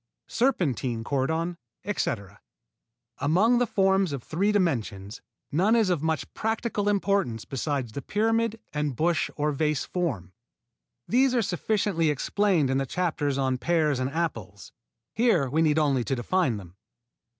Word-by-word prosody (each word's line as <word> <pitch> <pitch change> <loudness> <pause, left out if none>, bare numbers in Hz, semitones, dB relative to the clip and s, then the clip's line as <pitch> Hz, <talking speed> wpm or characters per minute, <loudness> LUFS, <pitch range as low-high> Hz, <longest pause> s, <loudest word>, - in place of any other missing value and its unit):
_ - - -18
Serpentine 135 - 0
cordon, 160 +7 -1 0.3
etc. 100 - -3 0.8
Among 205 +12 +3
the 245 - +2
forms 190 -4 +2
of 135 -4 -5
three 195 +6 0
dimensions 115 - -1 0.3
none 190 +9 +3
is 220 -5 +3
of 170 -5 0
much 160 0 -2
practical 220 -2 -1
importance 195 - 0
besides 135 -2 -3
the 140 - -5
pyramid 225 - 0
and 150 -3 -1
bush 165 +5 +1
or 150 0 0
vase 150 0 0
form. 120 - -3 0.7
These 255 +2 +3
are 235 - +2
sufficiently 195 -3 0
explained 160 0 +1
in 135 - +1
the 135 - -2
chapters 150 -4 -1
on 130 -2 0
pears 155 -4 +1
and 130 0 -1
apples. 115 - -4 0.4
Here 220 - +3
we 150 +5 +1
need 155 -1 +3
only 140 -5 +2
to 135 - 0
define 130 - 0
them. 95 -2 -12
160 Hz, 145 wpm, -26 LUFS, 130-200 Hz, 0.8 s, Among